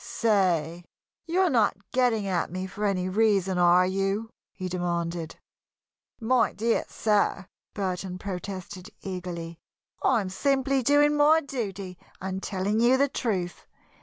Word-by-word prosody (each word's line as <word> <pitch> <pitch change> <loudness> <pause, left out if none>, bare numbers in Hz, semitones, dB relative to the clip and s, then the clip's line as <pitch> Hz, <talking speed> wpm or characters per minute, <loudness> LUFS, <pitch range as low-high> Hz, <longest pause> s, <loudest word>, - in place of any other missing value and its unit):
"Say, 175 -6 +1 0.4
you're 365 +2 +2
not 220 -6 +2
getting 245 -5 +2
at 185 -3 -1
me 185 +1 -3
for 205 +3 -4
any 185 -2 0
reason, 195 -2 +2
are 175 +1 +5
you?" 195 +4 -1 0.2
he 185 - -6
demanded. 170 -2 -3 0.8
"My 235 0 +2
dear 230 +2 0
sir!" 205 -2 +1 0.3
Burton 185 -2 -3
protested, 190 0 -6
eagerly. 175 -3 -6 0.4
"I 240 -4 +3
am 190 - -4
simply 275 +5 +1
doing 290 +3 +4
my 300 +2 +5
duty 200 - -5 0.2
and 190 0 -4
telling 200 +3 -1
you 245 +3 +5
the 280 +1 +2
truth. 190 -10 -3
195 Hz, 130 wpm, -27 LUFS, 180-230 Hz, 0.8 s, are